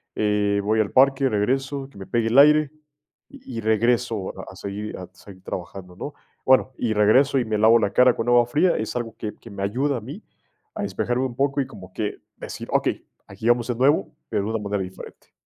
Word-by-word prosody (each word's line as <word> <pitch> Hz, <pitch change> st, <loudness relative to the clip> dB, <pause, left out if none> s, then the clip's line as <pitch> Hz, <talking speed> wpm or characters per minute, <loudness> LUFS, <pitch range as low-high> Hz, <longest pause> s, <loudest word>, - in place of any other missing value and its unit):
eh, 105 Hz, -1 st, +1 dB
voy 110 Hz, +2 st, +1 dB
al 105 Hz, -2 st, 0 dB
parque, 135 Hz, +1 st, +4 dB
regreso, 135 Hz, +5 st, -1 dB
que 135 Hz, -, -18 dB
me 95 Hz, -, -8 dB
pegue 115 Hz, +1 st, 0 dB
el 115 Hz, -, +1 dB
aire 150 Hz, +1 st, +6 dB, 0.6 s
y 130 Hz, -, -8 dB
regreso 110 Hz, -1 st, +1 dB, 0.2 s
a 95 Hz, -, -12 dB
seguir 100 Hz, +2 st, -6 dB
a 90 Hz, -1 st, -9 dB
seguir 95 Hz, 0 st, -15 dB
trabajando, 90 Hz, 0 st, -7 dB
¿no? 145 Hz, +9 st, -7 dB, 0.3 s
Bueno 130 Hz, 0 st, +4 dB
y 115 Hz, -3 st, -1 dB
regreso, 130 Hz, +7 st, +4 dB
y 120 Hz, -, -1 dB
me 110 Hz, -1 st, -1 dB
lavo 110 Hz, +2 st, +5 dB
la 100 Hz, -3 st, -1 dB
cara 125 Hz, -1 st, +5 dB
con 115 Hz, -, -3 dB
agua 120 Hz, -1 st, +5 dB
fría, 150 Hz, +9 st, +2 dB
es 110 Hz, +2 st, -4 dB
algo 115 Hz, -2 st, -4 dB
que 105 Hz, -, -5 dB
que 115 Hz, -, -14 dB
me 100 Hz, -1 st, -5 dB
ayuda 130 Hz, +7 st, 0 dB
a -, -, -6 dB
mí 140 Hz, -, -9 dB, 0.5 s
a -, -, -3 dB
despejarme 125 Hz, +2 st, -1 dB
un 120 Hz, -2 st, -5 dB
poco 140 Hz, +1 st, +1 dB
y 130 Hz, -, -3 dB
como 95 Hz, -7 st, -12 dB
que 105 Hz, -2 st, -3 dB, 0.2 s
decir, -, -, -8 dB
okey, -, -, 0 dB, 0.2 s
aquí 110 Hz, -, -6 dB
vamos 120 Hz, 0 st, +2 dB
de 125 Hz, -, -1 dB
nuevo, 135 Hz, +5 st, +2 dB, 0.2 s
pero 100 Hz, -, -1 dB
de -, -, -3 dB
una 110 Hz, -, -1 dB
manera 100 Hz, -1 st, -2 dB
diferente. 95 Hz, 0 st, -11 dB
115 Hz, 215 wpm, -23 LUFS, 105-130 Hz, 0.6 s, aire